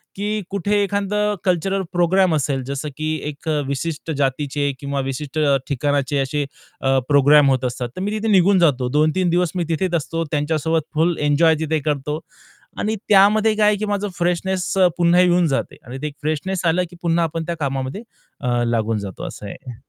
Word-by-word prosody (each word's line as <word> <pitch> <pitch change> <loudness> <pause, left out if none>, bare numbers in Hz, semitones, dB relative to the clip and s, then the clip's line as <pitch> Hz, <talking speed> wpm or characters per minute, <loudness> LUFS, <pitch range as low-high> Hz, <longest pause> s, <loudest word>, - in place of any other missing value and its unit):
की 210 +2 -2
कुठे 205 +1 +1
एखादा 200 +1 -1 0.3
कल्चरल 190 +2 +1
प्रोग्राम 175 0 +3
असेल, 135 -2 -1
जसं 140 +2 -4
की 155 0 -1 0.2
एक 145 +2 -11 0.2
विशिष्ट 160 +3 -3
जातीचे 140 +1 0
किंवा 140 -1 -3
विशिष्ट 135 +3 -4 0.3
ठिकाणाचे 145 0 0
असे 145 +2 -1 0.4
अ, 135 0 +2
प्रोग्राम 145 0 +6
होत 130 -1 0
असतात, 125 0 -3
तर - - -3
मी 205 +2 -1
तिथे 220 +1 -2
निघून 190 0 +5
जातो. 130 -7 +2
2-3 155 +5 +2
दिवस 175 -1 +1
मी 175 - 0
तिथेच 175 +2 0
असतो 165 +1 -2
त्यांच्यासोबत 160 +2 0
फुल 165 +2 +2
एन्जॉय 160 +2 +4
तिथे 160 0 0
करतो. 150 +1 -1 0.6
आणि 220 +1 0
त्यामध्ये 210 +2 +5
काय 210 -1 +3
आहे 210 - +4
की 215 - -2
माझं 205 0 -1
फ्रेशनेस 180 +1 -1
अ, 185 -1 +6
पुन्हा 175 +1 +4
येऊन 175 -1 +3
जाते 135 -2 -2
आणि 125 +3 -7
ते 150 - -2
एक 145 - -7
फ्रेशनेस 165 +5 -2
आलं 175 +2 +2
की 175 - -14
पुन्हा 170 0 +1
आपण 165 0 -3
त्या 170 - -3
कामामध्ये 135 +6 -3 0.4
अ, 120 -1 0
लागून 115 -2 0
जातो 100 -2 -7
असं - - -9
आहे. 125 - -9
160 Hz, 180 wpm, -21 LUFS, 140-185 Hz, 0.6 s, प्रोग्राम